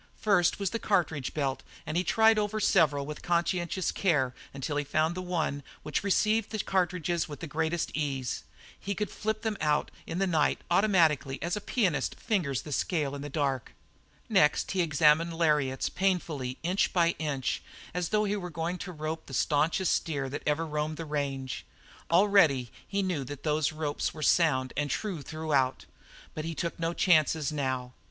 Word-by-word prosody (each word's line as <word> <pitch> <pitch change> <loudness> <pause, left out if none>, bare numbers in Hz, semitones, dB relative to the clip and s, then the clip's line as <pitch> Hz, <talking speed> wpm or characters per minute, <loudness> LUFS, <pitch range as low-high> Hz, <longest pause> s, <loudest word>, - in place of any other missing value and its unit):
The - - -27
first 200 -5 +3
was 200 -2 -1
the 230 - -2
cartridge 165 - 0
belt, 135 -3 -1 0.2
and 155 - -4
he 180 - +2
tried 220 +2 +4
over 210 +1 -1
several 145 -8 +3
with 150 +1 -7
conscientious 175 +1 0
care 145 -9 +1 0.2
until 140 +2 -3
he 145 - +1
found 155 +3 +1
the 185 - -4
one 165 -5 -1 0.2
which 150 +3 -2
received 215 +2 +2
the 220 - -3
cartridges 180 -4 0
with 145 - -7
the - - -5
greatest 160 +2 -1
ease. 135 -4 -2 0.4
He 200 0 -3
could 210 +1 -2
flip 220 0 -3
them 220 -2 -1
out 150 -1 +1 0.2
in 165 - -3
the 195 - +2
night, 160 -5 +2
automatically 160 - +3
as 170 +1 0
a 210 - -4
pianist 180 - 0
fingers 160 - -1
the 150 - -8
scale 145 -1 0
in 140 - -5
the 145 - -5
dark. 135 -4 -2 0.5
Next 170 -9 +3
he 190 - +1
examined 160 +1 +3
lariats 150 -5 +2
painfully, 165 -9 -1
inch 180 +4 +1
by 170 -2 +4
inch, 140 -5 -1 0.3
as 180 -1 -1
though 215 0 +2
he 205 0 0
were 180 -3 -4
going 165 +2 -3
out - - -10
to 185 - -5
rope 155 0 -5
the 135 - -5
stanchest 160 +7 +2
steer 140 -4 -1
that 140 - -4
ever 150 +2 +1
roamed 150 0 -2
the 165 - -5
range. 140 -3 -3 0.5
Already 170 - +4 0.2
he 200 0 -1
knew 180 -7 -1
that 140 +1 -8
those 150 -1 +1
ropes 155 -1 -2
were 155 - -5
sound 130 -8 +3
and 145 +1 -1
true 190 -4 -2
throughout, 145 -4 0 0.5
but 155 - -4
he 165 0 -4
took 170 +1 -3
no 165 0 0
chances 155 -4 +3
now. 130 -4 -2
160 Hz, 185 wpm, -29 LUFS, 145-180 Hz, 0.5 s, tried